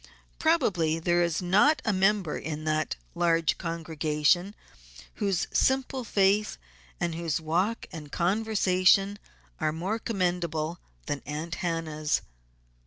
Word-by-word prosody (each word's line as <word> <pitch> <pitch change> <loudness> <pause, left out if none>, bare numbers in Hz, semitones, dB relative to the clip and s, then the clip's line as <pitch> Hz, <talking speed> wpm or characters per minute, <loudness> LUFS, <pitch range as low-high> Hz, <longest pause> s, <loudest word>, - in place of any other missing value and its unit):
Probably 200 - +2
there 175 +1 +2
is 170 0 0
not 210 - +4
a 220 - +2
member 195 -3 +2
in 155 -1 -5
that 155 0 0 0.2
large 165 -2 +1
congregation 165 +2 0 0.7
whose 195 -4 +1
simple 265 0 +1
faith 205 -1 +2 0.4
and 170 -1 -1
whose 165 -1 -2
walk 180 +8 -1
and 150 -4 -9
conversation 195 0 +2 0.4
are 155 -2 +1
more 185 +8 -2
commendable 175 -6 -1 0.3
than 145 - -3
Aunt 155 +3 -4
Hannah's. 160 -3 -1
175 Hz, 110 wpm, -28 LUFS, 160-200 Hz, 0.7 s, not